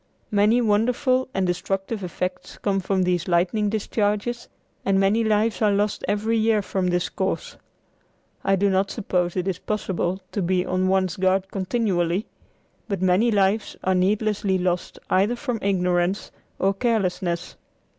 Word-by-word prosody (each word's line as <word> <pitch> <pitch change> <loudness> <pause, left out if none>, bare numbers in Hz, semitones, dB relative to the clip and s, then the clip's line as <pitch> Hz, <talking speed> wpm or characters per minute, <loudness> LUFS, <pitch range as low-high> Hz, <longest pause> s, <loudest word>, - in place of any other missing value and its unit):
Many 210 +4 +4
wonderful 250 +4 +2
and 190 -4 0
destructive 195 +4 -2
effects 180 +1 -4
come 195 -1 0
from 190 0 0
these 180 -2 0
lightning 190 +4 +2
discharges 210 +2 -1 0.3
and 195 0 +2
many 200 +4 +3
lives 220 +1 +1
are 210 -1 +4
lost 205 +1 0
every 220 +2 +1
year 220 -1 +2
from 190 -1 -1
this 175 0 +1
cause. - - -3 0.9
I 195 - +3
do 200 +1 +2
not 190 +1 +1
suppose 180 -5 -1
it 185 0 -1
is 185 -2 -2
possible 190 -3 -2
to 205 - -2
be 180 0 +1
on 185 +1 0
one's 185 -2 +1
guard 190 0 +1
continually, 190 -2 0 0.6
but 200 -4 -2
many 185 +6 +3
lives 205 0 +1
are 190 - +2
needlessly 200 +1 +1
lost 180 -1 -2
either 200 +6 +3
from 245 -3 -3
ignorance 180 -1 0 0.3
or 195 +1 +2
carelessness. 190 -6 -1
195 Hz, 145 wpm, -24 LUFS, 185-215 Hz, 0.9 s, Many